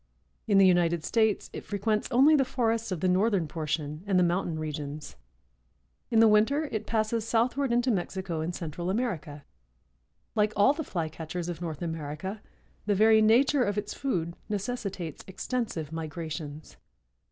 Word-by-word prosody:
In 205 -2 +4
the 195 - +7
United 170 -3 +3
States 220 -3 +1
it - - -6
frequents 210 +1 -1
only 275 +6 +6
the 275 - +4
forests 230 -4 -1
of 175 -3 -3
the 185 - +2
northern 185 -1 +2
portion 150 -1 -3
and 195 -2 +2
the 180 - +5
mountain 175 -1 0
regions. 150 -1 -5 0.9
In 225 - +3
the 225 - +7
winter 220 +8 +4
it 215 -1 -3
passes 220 0 0
southward 240 +4 +1
into 240 +1 +2
Mexico 185 -3 -2
and 170 +2 -3
Central 170 +1 -4
America. 175 - -3 0.9
Like 215 0 +2
all 205 +7 +5
the 315 +1 -4
Flycatchers 165 - -4
of 175 -1 -5
North 165 -1 -4
America, 165 +5 -5 0.5
the 205 - +3
very 220 +2 +5
nature 250 +5 +4
of 205 -2 -1
its 210 0 -3
food 170 -11 -2
necessitates 200 - -4
extensive 190 - -3
migrations. 155 -2 -6
195 Hz, 155 wpm, -28 LUFS, 165-225 Hz, 0.9 s, the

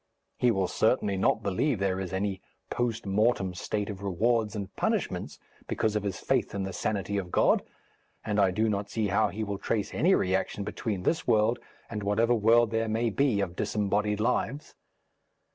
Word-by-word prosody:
He 125 - +4
will 95 -5 +1
certainly 110 -2 +1
not 95 - +1
believe 110 +7 +1
there 95 -1 0
is 95 -2 -4
any 95 0 -2 0.3
post 120 -3 -1
mortem 100 -1 +1
state 105 +3 -3
of 100 -2 -6
rewards 110 +3 +1
and 100 -2 -6
punishments - - -1 0.3
because 110 -1 0
of 105 - +1
his 100 -2 -3
faith - - 0
in 100 - -1
the 95 0 -4
sanity 100 0 -1
of 90 -2 -6
God, - - +3 0.6
and 105 -1 0
I 100 -2 +5
do 110 +5 +1
not 100 -1 -1
see 110 -3 -1
how 105 +3 +3
he 110 +2 -4
will 100 -2 -4
trace 105 -3 -2
any 185 +4 +4
reaction 95 +2 0
between 100 -2 -3
this 160 - 0
world 110 +2 +3 0.3
and 105 -2 -5
whatever 105 +4 +2
world 115 0 +4
there 115 0 0
may 115 +1 0
be 125 -3 +2
of 90 -3 -3
disembodied 105 +1 0
lives. 125 +4 -1
105 Hz, 180 wpm, -28 LUFS, 100-115 Hz, 0.6 s, I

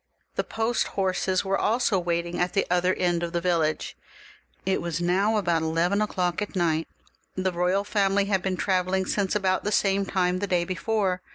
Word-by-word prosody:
The - - -1
post 225 +1 -1
horses 185 0 0
were 195 0 0
also 225 -3 +2
wait 170 -1 -1
ing 170 0 -5
at 175 0 0
the 195 - +2
other 180 +1 +3
end 175 -1 0
of 170 0 -3
the 170 - +1
village. 170 -3 0 0.7
It 190 0 +1
was 170 -1 -3
now 195 +5 +2
about 170 -5 +1
eleven 165 +5 +1
o'clock 180 -3 -1
at 210 - -4
night; 165 -3 +1 0.5
the 185 0 0
royal 180 +3 +1
family 200 -1 +1
had 195 -2 +1
been 185 0 -2
travel 185 -1 0
ling 190 0 +1
since 195 +1 -1
about 190 -2 +1
the 210 - -1
same 195 -1 +2
time 180 -1 +1
the 205 - -2
day 175 -2 +1
before. 190 0 -1
185 Hz, 195 wpm, -26 LUFS, 175-195 Hz, 0.7 s, other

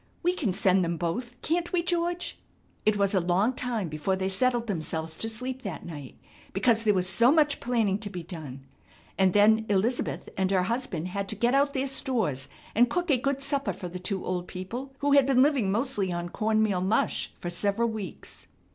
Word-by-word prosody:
We 355 +1 +3
can 265 - -1
send 185 0 +3
them 170 0 -1
both, 240 +9 -3
can't 345 +2 0
we 350 -2 +1
George?" 345 0 -2 0.5
It 215 -1 +4
was 200 0 +1
a 190 - +4
long 185 +7 +2
time 240 -7 -2
before 155 +5 -1
they 190 0 -1
settled 240 +4 +1
themselves 160 -5 -3
to 225 - -1
sleep 250 +3 -4
that 195 -8 -6
night 145 -6 -8 0.4
because 225 +3 +3
there 210 -2 +4
was 185 -1 +1
so 235 +6 +5
much 300 -2 +3
planning 225 -5 +1
to 210 -2 -5
be 180 -3 -6
done, 150 -6 -8 0.5
and 190 -1 +3
then 220 +2 +5
Elizabeth 210 +5 0
and 190 -1 +1
her 190 -2 +2
husband 210 -5 -2
had 195 +1 -3
to - - -1
get 235 +4 +1
out 280 +1 +2
their 265 0 +1
stores 230 - -1 0.2
and 240 +3 +4
cook 355 -3 0
a 265 - +4
good 275 +2 -1
supper 275 -7 -1
for 180 0 -7
the 180 +1 -6
two 190 +1 -3
old 180 -1 -2
people 240 +9 -6
who 285 0 +2
had 280 -2 +6
been 260 -1 +5
living 270 -9 +2
mostly 215 -4 0
on 175 0 -3
corn 220 +3 +1
meal 195 -4 +1
mush, 195 +4 0
for 175 - -4
several 205 +5 0
weeks. 215 -5 -8
215 Hz, 205 wpm, -27 LUFS, 185-255 Hz, 0.5 s, had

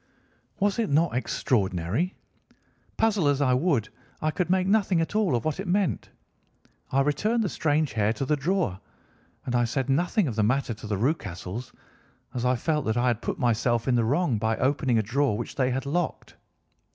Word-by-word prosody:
Was 205 +1 +1
it 225 - 0
not 155 +2 +2
extraordinary? 110 - 0 0.8
Puzzle 210 -8 +2
as 140 -1 +2
I 130 -3 +3
would, 130 - +1 0.3
I 155 - 0
could 175 +2 -2
make 185 0 +2
nothing 195 -3 +2
at 165 - -1
all 210 - +2
of 115 - -2
what 155 +3 -1
it 195 - -4
meant. 180 - 0 0.8
I 135 - +3
returned 210 +12 +1
the 200 - -1
strange 155 -2 0
hair 105 -1 +2
to 135 - -3
the 150 - +2
drawer, 150 - -1 0.7
and 125 - -3
I 120 0 +3
said 130 +3 -1
nothing 175 +6 +1
of 120 - -3
the 110 - +1
matter 125 +3 +1
to 110 0 -9
the 105 -1 -1
Rucastles 105 - -3 0.6
as 125 -1 -2
I 125 +1 +3
felt 150 +4 -1
that 110 +1 0
I 120 - +2
had 120 -2 -1
put - - -3
myself 120 -1 +1
in 130 - +3
the 120 -1 +3
wrong 135 -1 +1
by 110 +1 0
opening 130 -2 +1
a 110 - +2
drawer 120 0 +1
which 120 - -5
they 130 -2 +1
had 130 +2 -2
locked. 170 +4 -2
135 Hz, 195 wpm, -26 LUFS, 115-170 Hz, 0.8 s, I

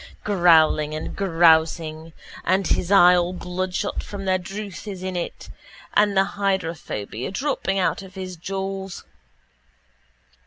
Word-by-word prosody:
Growling 160 -5 +4
and 155 - -5
grousing 165 -3 +2 0.3
and 190 +2 +1
his 180 +2 0
eye 180 -2 +7
all 175 0 0
bloodshot 185 +2 -3
from 200 -1 -7
the 185 -1 +2
drouth 195 +1 -7
is 190 -3 -6
in 185 -1 -4
it 175 - -5 0.5
and 205 -1 +3
the 195 - +6
hydrophobia 165 - -3
dropping 195 -3 -1
out 190 +1 0
of 190 0 -13
his 185 -1 -6
jaws. 195 +2 -5
185 Hz, 125 wpm, -23 LUFS, 170-195 Hz, 0.5 s, eye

